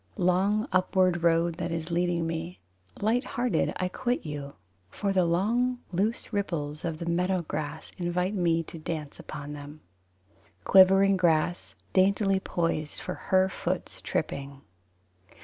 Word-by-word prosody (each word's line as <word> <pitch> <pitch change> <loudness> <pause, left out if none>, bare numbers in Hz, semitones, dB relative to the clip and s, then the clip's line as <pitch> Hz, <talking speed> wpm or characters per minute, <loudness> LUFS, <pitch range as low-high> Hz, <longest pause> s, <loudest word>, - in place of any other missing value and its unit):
Long 195 +6 +2
upward 185 -1 +2
road 170 0 +2
that - - -2
is 165 0 -3
leading 175 -1 +1
me, 165 +2 -4 0.4
Light 230 +5 +2
hearted 245 0 0
I 185 - -1
quit 245 +5 -2
you, 145 -2 -6 0.3
For 200 - -2
the 185 -2 +3
long 230 +9 +1
loose 210 +6 -1
ripples 155 -7 -2
of 165 -2 -2
the 170 - -5
meadow 180 +2 +1
grass 155 0 -5
Invite 180 +2 0
me 170 -4 +1
to 165 - -10
dance 155 -2 -5
upon 145 0 -7
them. 145 +1 -9 0.8
Quivering 195 - +6
grass 160 - +1 0.2
Daintily 195 +1 +3
poised 165 -4 -2
For - - -4
her 190 0 +2
foot's 190 - -4
tripping. 140 0 -3
175 Hz, 135 wpm, -28 LUFS, 160-190 Hz, 0.8 s, Quivering